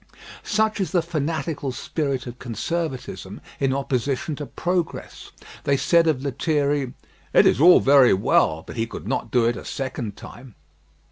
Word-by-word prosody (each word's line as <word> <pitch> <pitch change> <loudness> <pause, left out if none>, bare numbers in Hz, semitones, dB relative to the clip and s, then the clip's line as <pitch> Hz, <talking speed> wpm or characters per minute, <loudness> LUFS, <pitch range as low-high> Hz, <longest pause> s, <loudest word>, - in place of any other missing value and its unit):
Such 215 0 0
is 185 -6 -2
the 175 -3 +3
fanatical 155 -3 -2
spirit 135 +1 -3
of 120 0 -9
conservatism 135 +4 -4 0.2
in 135 -1 +1
opposition 135 +2 -1
to 145 - -6
progress. 175 -1 -3 0.3
They 140 0 +2
said 170 +3 +3
of 140 -4 +1
Lethierry, 145 -1 0 0.4
"It - - +6
is - - +3
all 175 +2 +8
very 135 -5 +6
well; 80 -4 +2
but - - -9
he 115 0 0
could - - -8
not - - -2
do 120 -2 +2
it 120 0 +1
a - - -8
second 125 -6 -5
time." 120 -2 -12
140 Hz, 155 wpm, -23 LUFS, 125-160 Hz, 0.4 s, all